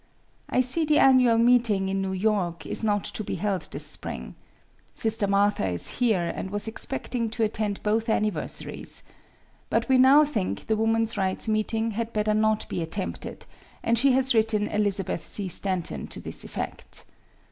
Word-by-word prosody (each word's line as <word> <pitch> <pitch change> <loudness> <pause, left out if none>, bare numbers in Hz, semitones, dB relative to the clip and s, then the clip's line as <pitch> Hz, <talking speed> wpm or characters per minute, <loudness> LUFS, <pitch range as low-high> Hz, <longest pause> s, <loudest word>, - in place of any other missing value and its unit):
"I 255 - +2
see 255 +6 +2
the 305 -1 +3
annual 255 -3 +5
meeting, 230 -5 +3
in 195 0 -1
New 190 0 -2
York, 190 -3 -1
is - - -1
not 205 -2 +1
to 215 - -3
be - - -4
held 200 -3 -2
this - - -4
spring. - - -4 0.6
Sister 220 -2 +1
Martha 200 - +2
is 90 - -2
here, 220 -8 +2
and 190 - -5
was 205 +2 -1
expecting 235 0 0
to 225 +1 -2
attend 210 -2 -2
both 220 +2 0
anniversaries. 215 -1 -3 0.7
But - - 0
we 260 -1 +4
now 275 +4 +7
think 220 -11 -3
the 220 - +1
woman's 225 0 0
rights 190 +2 -1
meeting 220 +1 0
had 230 +2 -4
better 215 0 +1
not 215 0 +1
be - - -3
attempted, 175 +4 -5 0.4
and 230 - +2
she 260 +3 +4
has 260 0 +3
written 220 -2 +2
Elizabeth 200 -4 0
C. 200 -2 -1
Stanton 175 - -1
to - - -3
this - - -4
effect. - - -5
215 Hz, 170 wpm, -26 LUFS, 200-230 Hz, 0.7 s, now